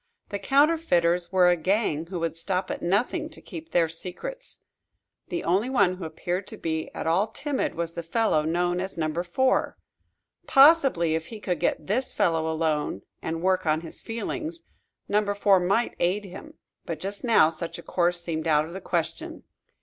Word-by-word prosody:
The 200 - -3
counterfeiters 270 - +2
were 185 -2 +5
a 175 - +5
gang 170 -3 0
who 180 -1 -4
would 165 -1 -1
stop 185 +2 -2
at - - -4
nothing 240 - 0
to - - -12
keep 165 -4 -9
their 165 0 +3
secrets. 185 - -6 0.6
The 345 - -3
only 195 +8 +1
one 200 -8 +2
who 180 - -6
appeared 175 +4 -3
to - - -8
be 160 -1 -3
at - - -4
all 170 +6 +2
timid 275 +5 -2
was 170 0 -3
the 170 - -4
fellow 170 -1 +1
known 175 +3 0
as 190 0 -5
Number 155 +1 -1
Four. 260 +10 +1 0.7
Possibly 270 - +5
if 160 0 -2
he 220 - -8
could 180 -5 -2
get 150 - 0
this 245 - -1
fellow 160 -1 +1
alone 155 - -1 0.2
and 165 +1 -4
work 185 -2 +1
on 155 +1 +2
his 165 - -8
feelings 310 - -4 0.5
Number 205 0 +1
Four 200 -1 +4
might 200 +7 +1
aid 190 +4 +1
him. 245 - -10 0.3
But 165 - -5
just 200 +1 -5
now 220 -10 +5
such 165 +1 -5
a 170 - -10
course 175 -1 0
seemed 165 -2 -3
out 150 -1 +3
of 165 - -10
the 190 - -6
question. 170 -3 -3
180 Hz, 180 wpm, -26 LUFS, 165-210 Hz, 0.7 s, were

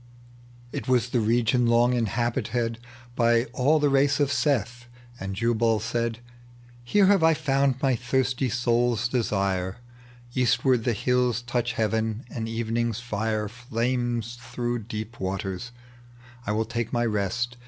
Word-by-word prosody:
It - - -5
was 125 -2 +2
the 120 - +1
region 120 +2 +2
long 120 +1 +4
inhabited 120 0 -1 0.4
By 115 -1 +3
all 145 +5 +3
the 150 -1 +2
race 140 +1 +3
of 145 -1 +2
Seth; 120 -3 0 0.3
and 95 0 -4
Jubal 115 0 +2
said, 115 +1 -2 0.3
" - - -24 0.3
Here 195 +12 +3
have 195 -1 +4
I 160 0 +5
found 135 -3 +1
my 135 -2 +3
thirsty 130 +2 0
soul's 120 0 +1
desire, 100 -6 -1 0.6
Eastward 125 -1 +2
the 120 -3 +1
hiUs 125 +1 +1
touch 120 -1 -1
heaven, 110 +1 -1
and 115 -1 -4
evening's 115 0 -1
flre* 110 -2 -2
Flames 120 0 -2
through 120 0 -3
deep 110 0 -6
waters; 95 +3 -3 0.8
I - - +1
will 110 +1 0
talie 115 0 -3
my 120 0 +1
rest. 115 +3 -1
120 Hz, 140 wpm, -26 LUFS, 110-125 Hz, 0.8 s, I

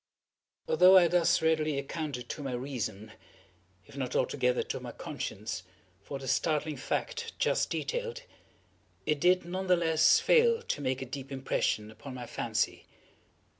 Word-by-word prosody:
Although 180 +4 +7
I 175 -2 +7
thus 170 -1 +3
readily 155 -2 +2
accounted 140 -3 -4
to - - -5
my 135 -3 -4
reason, 110 -5 -4 0.7
if 145 - -16
not 130 -3 -3
altogether 125 -2 +1
to - - -4
my - - -7
conscience, 100 -2 -5 0.4
for 140 +7 -6
the 135 -1 -8
startling 155 0 0
fact 465 - -3
just - - +1
detailed, - - -3 0.8
it 150 -1 +1
did 180 +2 +3
not 185 +2 -4
the 180 -1 +5
less 160 -2 +4
fail 470 -1 +4
to 145 - -3
make 130 -1 -1
a - - -6
deep 135 +1 -7
impression 120 -5 -1
upon 130 +5 -10
my 125 -1 -6
fancy. - - -2
145 Hz, 150 wpm, -30 LUFS, 130-175 Hz, 0.8 s, Although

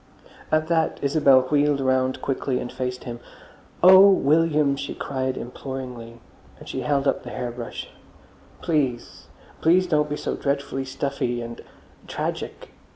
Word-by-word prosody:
At 155 0 +2
that 165 -1 +1
Isabel 140 -2 +5
wheeled 145 +2 +1
round 130 -1 0
quickly 135 -1 -1
and 120 - -5
faced 125 0 -4
him. 120 -2 -7 0.6
"Oh, 190 +2 +9
William!" 150 -4 +3
she 140 0 -5
cried 130 -1 -3
imploringly, 125 -2 -7 0.4
and - - -14
she - - -4
held 140 -1 0
up - - +1
the - - -9
hair 125 -1 -4
brush: 120 0 -7 0.8
"Please! 135 -7 -2 0.3
Please 180 +3 +4
don't 150 -4 +1
be 150 - -3
so - - -3
dreadfully 140 -1 -2
stuffy 130 -2 -2
and—tragic. 115 0 -7
140 Hz, 135 wpm, -24 LUFS, 130-150 Hz, 0.8 s, Oh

